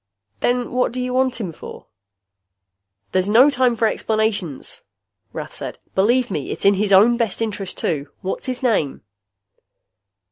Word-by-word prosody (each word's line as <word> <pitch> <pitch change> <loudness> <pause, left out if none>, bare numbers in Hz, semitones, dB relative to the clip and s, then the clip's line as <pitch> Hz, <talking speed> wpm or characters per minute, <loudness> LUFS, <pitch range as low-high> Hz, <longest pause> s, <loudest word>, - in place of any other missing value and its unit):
"Then 245 0 0
what 250 -1 0
you 250 0 -2
want 255 -1 +1
him 190 -7 -3
for?" - - -11 1.3
"There's 185 +1 +1
no 250 +7 +6
time 255 -3 +2
for 225 0 +2
explanations," 215 -10 -2 0.5
Rath - - -7
said. - - -6 0.2
"Believe 240 +5 +2
me, 150 -7 -3
it's - - -3
in 200 - +7
his 200 +1 0
own 215 +5 +6
best 230 -5 -1
interest, 210 -4 -3
too. 145 -3 -2
What 190 -1 -3
is - - -7
his 255 0 -3
name?" 200 - 0
220 Hz, 150 wpm, -21 LUFS, 190-250 Hz, 1.3 s, in